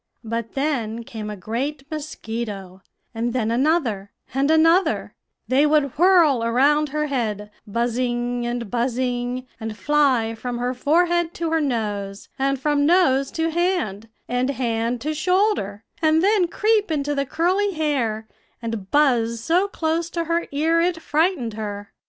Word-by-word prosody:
"But 230 0 -4
then 240 -6 -1
came 220 -2 -7
a 210 - -5
great 265 +9 -3
mosquito, 220 -10 -6 0.3
and 230 +1 -2
then 230 -3 0
another, 240 - +1 0.2
and 275 +2 +1
another; 330 +4 +3 0.3
they 275 +4 +4
would 295 -3 +2
whirl 335 -8 +4
around 285 +6 +3
her 300 +2 -1
head, 215 -7 -2 0.2
buzzing 240 +2 -1
and 240 -3 -3
buzzing, 245 +1 -1
and 220 -2 -5
fly 270 -7 +2
from 240 +2 -5
her 245 +1 -1
forehead 340 +5 +1
to 330 -1 -2
her 325 -1 +2
nose, 210 -7 -3
and 275 0 +1
from 290 +1 +1
nose 275 -6 +3
to 325 0 0
hand, 320 - -1 0.2
and 250 +2 0
hand 235 -2 -1
to 310 +3 -2
shoulder, 360 - 0 0.2
and 315 +1 +3
then 400 -3 +3
creep 425 +2 +1
into 290 -2 -1
the 275 -1 -1
curly 380 +6 +1
hair, 250 -9 -1 0.3
and 225 -4 -5
buzz 240 -6 +2
so 345 - +2
close 330 -2 -1
to 340 -1 -2
her 335 +1 -1
ear 320 +4 +2
it 345 -1 0
frightened 305 - 0
her. 205 -1 -6
265 Hz, 145 wpm, -22 LUFS, 230-320 Hz, 0.3 s, they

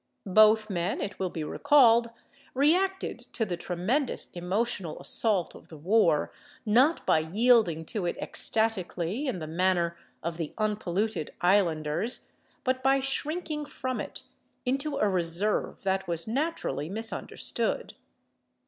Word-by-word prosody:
Both 215 +2 +5
men, 180 -1 -2
it 200 -1 -5
will 190 -1 -1
be 160 -2 -5
recalled, 235 - +4 0.5
reacted 365 +8 +1
to 225 - 0
the 180 -4 -3
tremendous 190 - -2
emotional 180 -1 -2
assault 205 -6 +1
of - - -15
the 160 - -12
war, 170 -2 +2 0.3
not 255 +10 +3
by - - +4
yielding 180 -1 +2
to 195 -5 -1
it - - -3
ecstatically 220 - 0
in 255 - -2
the 160 - -6
manner 170 +1 0 0.3
of 170 0 -3
the 165 -3 -5
unpolluted 210 -4 -2
islanders, 175 +2 +1 0.3
but 255 0 0
by 270 +1 +3
shrinking 300 +3 -1
from 260 -3 -4
it - - -7 0.4
into 275 +3 -1
a 210 - +2
reserve 185 +2 0
that 190 -1 -1
was 170 +1 +1
naturally 270 - -2
misunderstood. 225 - -2
210 Hz, 130 wpm, -28 LUFS, 175-255 Hz, 0.5 s, Both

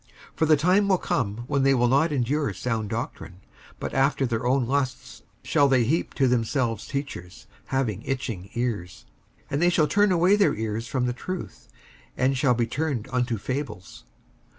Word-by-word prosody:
55:004:003 - - -35
For 160 - +3
the 155 -1 +5
time 185 +7 +3
will 190 -2 +4
come 120 - -1
when 140 +1 0
they 135 0 +4
will 120 -1 +3
not 140 +6 +3
endure 140 -2 0
sound 110 +2 -2
doctrine; 115 - -5 0.4
but - - -4
after 135 0 +2
their 115 -1 -1
own 130 0 +2
lusts 130 0 -2 0.2
shall 145 - +3
they 130 -3 +3
heap 150 +9 -1
to 135 - +3
themselves 120 -1 0
teachers, 140 -11 -6 0.2
having 120 -7 -1
itching 115 -9 -4
ears; 110 -8 -3 0.4
55:004:004 - - -35
And 140 +3 0
they 175 - +5
shall 160 -3 +3
turn 205 +2 +3
away 180 +3 +4
their 205 -1 +3
ears 110 +1 -3
from 125 +1 -1
the 125 - 0
truth, 145 - -7 0.5
and 130 +2 +2
shall 130 -1 +2
be 120 0 +1
turned 135 -3 -3
unto 125 -2 0
fables. 125 -4 -5
130 Hz, 180 wpm, -25 LUFS, 115-145 Hz, 0.5 s, the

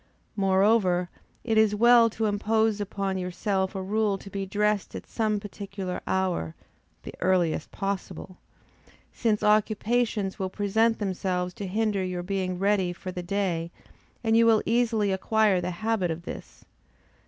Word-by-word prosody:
Moreover, 190 -2 +2 0.3
it 220 -2 +2
is 215 -1 +3
well 235 +1 +6
to 220 0 -2
impose 215 +1 +1
upon 195 -1 -2
yourself 190 +2 -2
a 190 - -3
rule 210 0 0
to 195 +1 -12
be 195 0 -4
dressed 210 +1 0
at - - -7
some 215 -2 -1
particular 200 -2 -6
hour 180 - -1 0.5
(the - - -8
earliest 180 -4 +1
possible,) 195 -1 -5 0.8
since 215 -2 0
occupations 215 0 +1
will 190 -1 -1
present 220 +4 +1
themselves 185 -2 -2
to 200 - -6
hinder 210 0 0
your 180 -1 -3
being 185 -1 -2
ready 195 -2 +1
for 185 +1 -7
the 180 - -5
day; 175 -3 -1 0.5
and 225 -1 +2
you 230 0 +5
will 220 -2 +4
easily 225 -3 +1
acquire 200 0 +2
the 180 - -2
habit 200 0 -1
of 165 +1 -4
this. - - -9
200 Hz, 145 wpm, -26 LUFS, 185-215 Hz, 0.8 s, well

